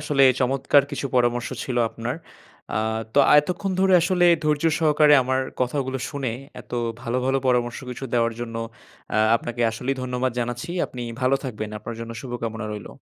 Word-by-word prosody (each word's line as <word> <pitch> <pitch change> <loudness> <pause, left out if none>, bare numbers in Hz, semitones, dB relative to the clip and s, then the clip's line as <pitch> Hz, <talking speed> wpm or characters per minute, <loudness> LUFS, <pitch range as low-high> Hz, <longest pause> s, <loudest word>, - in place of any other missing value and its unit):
আসলে 145 -2 +2 0.2
চমৎকার 135 +2 +3
কিছু 140 -1 -3
পরামর্শ 120 -1 +2
ছিল 125 - -3
আপনার। 115 +2 -4 0.6
আ - - +2 0.4
তো - - +4 0.2
এতক্ষন 180 +5 -3
ধরে 190 0 +4
আসলে 175 +1 +3 0.2
ধৈর্য 150 0 +1
সহকারে 150 -2 +5
আমার 130 +1 0 0.2
কথাগুলো 130 +1 -1
শুনে, 135 -5 -3 0.3
এত - - -18 0.3
ভালো, 120 0 -2
ভালো 135 +1 +2
পরামর্শ 120 -1 +1
কিছু 125 +2 -6
দেওয়ার 115 -1 +2
জন্য 115 -1 -5 0.6
আ - - +3 0.2
আপনাকে 120 +1 -6
আসলেই 125 +5 -3
ধন্যবাদ 125 0 -1
জানাচ্ছি। 120 +5 -4 0.2
আপনি 125 - -7 0.2
ভালো 130 +1 +3
থাকবেন। 110 -4 -4
আপনার 115 +2 -7
জন্য 115 0 -6
শুভকামনা 115 -3 -4
রইলো। 105 -1 -8
125 Hz, 160 wpm, -24 LUFS, 120-140 Hz, 0.6 s, সহকারে